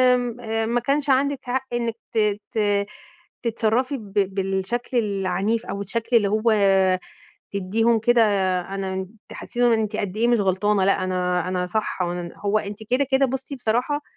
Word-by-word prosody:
آمم 230 -2 -2
ما 245 - +3
كانش 285 +2 0
عندِك 275 +1 +2
حق 260 +1 -2
إنَّك 235 -1 -1 0.2
ت 210 -2 +1
ت 205 -2 +1 0.6
تتصرَّفي 235 +4 0
ب 205 -4 -12 0.2
بالشكل 195 +6 -1
العنيف 200 +1 0
أوي، 200 - -4
الشكل 230 +4 +1
اللي 205 -3 +2
هو 215 +1 +2 1.0
تدِّيهُم 220 +4 +1
كده، 235 +1 +4 0.4
أنا 190 0 -4 0.2
تحسِّسيهم 240 -1 0
إن 220 - +2
أنتِ 215 -1 -2
قد 200 0 -3
إيه 235 +2 +2
مش 240 -2 +3
غلطانة، 195 +1 +2
لأ 195 -1 +2
أنا 180 -1 0
أنا 180 -1 -1
صح. 215 -1 -2
وأن 175 -1 -3
هو 205 +1 +1
أنتِ 205 +2 -7
كده 255 +3 +3
كده، 270 +1 +4
بُصي 265 +2 -4
بصراحة، 250 +5 0
220 Hz, 155 wpm, -23 LUFS, 195-240 Hz, 1.0 s, كده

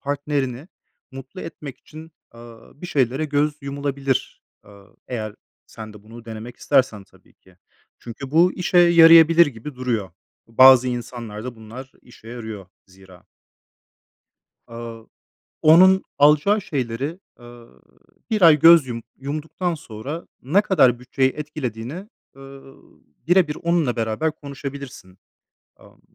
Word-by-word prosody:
partnerini 140 0 -3 0.4
mutlu 135 +7 -11
etmek 150 -4 -9
için, 160 +1 -14 0.2
eee, 115 - -14 0.3
bir 150 +6 -10
şeylere 135 -1 -1
göz 145 0 0
yumulabilir. 140 -1 -3 0.2
Eee, - - -17 0.4
eğer 110 -4 -5 0.3
sen 110 -1 -11
de 105 -1 -15
bunu 115 +2 -14
denemek 115 +1 -9
istersen 130 -8 0
tabii - - -26
ki. 95 -1 -25 0.4
Çünkü 120 +3 -10
bu 170 +4 +3
işe 180 0 0
yarayabilir 165 -1 +7
gibi 135 +1 -9
duruyor. 120 -7 -3 0.4
Bu, 115 - -25
bazı 130 -1 +7
insanlar 120 -3 -7
da 125 -2 -7
bunlar 115 +4 -11
işe 120 -2 -17
yarıyor 110 -5 -8 0.2
zira. 95 -1 -19 1.4
Aaa, 115 -1 -9 0.6
onun 185 +4 +6
alacağı 150 +9 +3
şeylere, 135 +3 -4 0.2
eee, 120 -1 -14 0.6
1 215 -2 -1
ay 160 -3 +6
göz 165 -2 +7
yum 115 -2 -6 0.2
yumduktan 155 +6 -4
sonra, 145 +2 -8 0.2
ne 160 +11 +2
kadar 130 - +2
bütçeyi 130 +1 0
etkilediğini, 150 - -7 0.3
eee, 135 - -16 0.9
bire 175 0 +4
bir 150 - -5
onunla 170 -7 0
beraber 115 +8 -2
konuşabilirsin. 140 -9 -10 0.6
Amm. - - -21
135 Hz, 125 wpm, -21 LUFS, 115-155 Hz, 1.4 s, yarayabilir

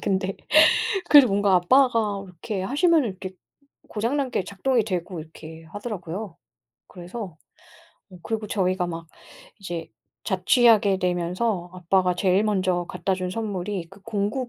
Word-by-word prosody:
근데 190 0 -1 0.7
그래도 285 -4 +9
뭔가 200 -1 +3
아빠가 220 0 +3
이렇게 185 +2 -6
하시면은 295 - +2
이렇게 185 -1 -7 0.6
고장난 255 +5 -1
게 195 - -1
작동이 225 +5 0
되고 180 -3 -4
이렇게 160 +1 -12
하더라고요. 195 -1 -6 0.5
그래서 180 -1 -8 0.7
어 180 - -13
그리고 220 +2 -3
저희가 185 -3 0
막 165 -1 -6 0.5
이제 175 -4 -6 0.4
자취하게 205 +1 +4
되면서 180 +2 -1
아빠가 180 0 +1
제일 185 +2 +2
먼저 185 -4 0
갖다 195 - -2
준 185 -1 -4
선물이 195 -4 -4
그 195 - -16
공구 225 +3 -2
195 Hz, 300 characters per minute, -24 LUFS, 180-220 Hz, 0.7 s, 그래도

